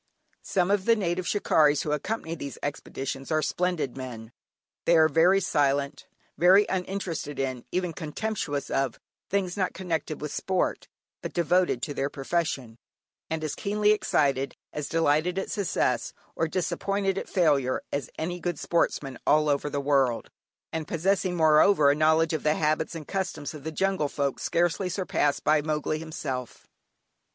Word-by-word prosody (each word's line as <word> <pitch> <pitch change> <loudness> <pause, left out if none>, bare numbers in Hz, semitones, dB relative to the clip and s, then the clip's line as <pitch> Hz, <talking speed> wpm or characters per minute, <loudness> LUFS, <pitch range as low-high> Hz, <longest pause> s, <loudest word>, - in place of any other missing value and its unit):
Some 185 0 0
of 200 -2 +1
the 230 - +5
native 180 -3 -1
"shikarries" 150 -7 +3
who 150 - -2
accompany 165 +3 -2
these 140 -4 -6
expeditions 135 -2 -4
are 155 -1 +2
splendid 175 -6 -1
men. 120 -4 -7 0.5
They 170 - +5
are 160 0 +6
very 170 +6 +4
silent, 140 -5 0 0.3
very 190 +4 +6
uninterested 180 -6 -3
in, 130 -3 -3
even 180 -2 -1
contemptuous 155 -3 -3
of, 135 -3 0 0.3
things 185 -2 0
not 185 -3 -1
connected 165 -5 -3
with 150 -1 -5
sport, 185 -1 -1 0.3
but - - -6
devoted 175 -6 +2
to 145 - -2
their 140 0 -1
profession, 135 -6 -2 0.5
and 160 0 -2
as 155 - -2
keenly 210 0 +1
excited, 140 -9 +1 0.2
as 150 -1 -4
delighted 165 +2 +2
at 195 - -2
success, 200 -5 0 0.2
or 165 - 0
disappointed 195 +3 -1
at - - -8
failure, 145 -8 +2
as 140 -3 -2
any 175 +3 -3
good 175 -2 -2
sportsman 140 -6 -1
all 150 -1 +4
the 145 0 -3
world 135 -4 +2
over; - - -25 0.4
and 160 -1 -3
possessing 185 +2 0
moreover 155 -1 +5
a - - +1
knowledge 160 +1 +3
of 155 - -1
the 150 0 +2
habits 155 +2 0
and 155 -3 -7
customs 180 -7 -3
of 150 -3 -9
the 160 - -4
jungle 190 -2 0
folk 140 -1 -2
scarcely 175 +2 0
surpassed 175 -6 0
by 155 0 +4
"Mowgli" 155 0 -1
himself. 135 -6 -5
160 Hz, 155 wpm, -27 LUFS, 145-180 Hz, 0.5 s, are